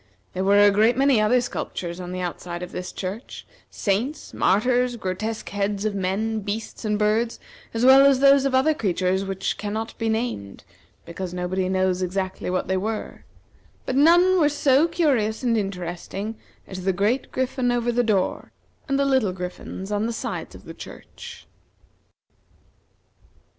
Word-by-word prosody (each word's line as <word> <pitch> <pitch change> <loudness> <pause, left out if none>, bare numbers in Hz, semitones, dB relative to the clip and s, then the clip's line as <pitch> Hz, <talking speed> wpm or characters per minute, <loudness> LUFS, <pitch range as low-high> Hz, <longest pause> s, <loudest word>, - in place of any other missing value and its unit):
There 185 - -2
were 200 +1 +4
a 205 0 +7
great 220 +4 +3
many 270 -4 +4
other 240 +4 +3
sculptures 175 -7 -5
on 180 -1 -6
the 185 0 -4
outside 175 0 -5
of 180 - -7
this 180 - -5
church, 195 +6 -6 0.2
saints, 235 +10 -2
martyrs, 245 +5 +2
grotesque 215 +2 -4
heads 200 0 -2
of 215 - 0
men, 200 +4 -1
beasts, 210 +3 -5
and 210 -1 0
birds, 215 +3 +1 0.3
as 230 +2 0
well 265 +1 +8
as 275 -2 +4
those 275 0 +6
of 270 -1 +1
other 270 +4 +4
creatures 190 - 0
which 195 0 -3
cannot 215 +2 -4
be 225 -1 0
named, 220 - -3 0.4
because 180 +1 -6
nobody 185 +1 -1
knows 185 -1 +1
exactly 185 +1 -3
what 185 0 -1
they 190 - 0
were; 215 +3 -4 0.6
but 260 - -2
none 350 +6 +5
were 300 -3 +4
so 290 +1 +3
curious 270 -11 0
and 235 -2 +2
interesting 195 +1 -4 0.3
as 185 -1 -8
the 190 0 +1
great 210 +8 0
griffin 255 -1 0
over 240 0 0
the 240 +1 +2
door, 210 -5 0 0.4
and 275 - +2
the 280 - +2
little 260 -8 +2
griffins 180 +2 -7
on 210 +2 0
the - - -2
sides - - -5
of - - -14
the - - -8
church. 470 0 -11
215 Hz, 165 wpm, -24 LUFS, 190-250 Hz, 0.6 s, well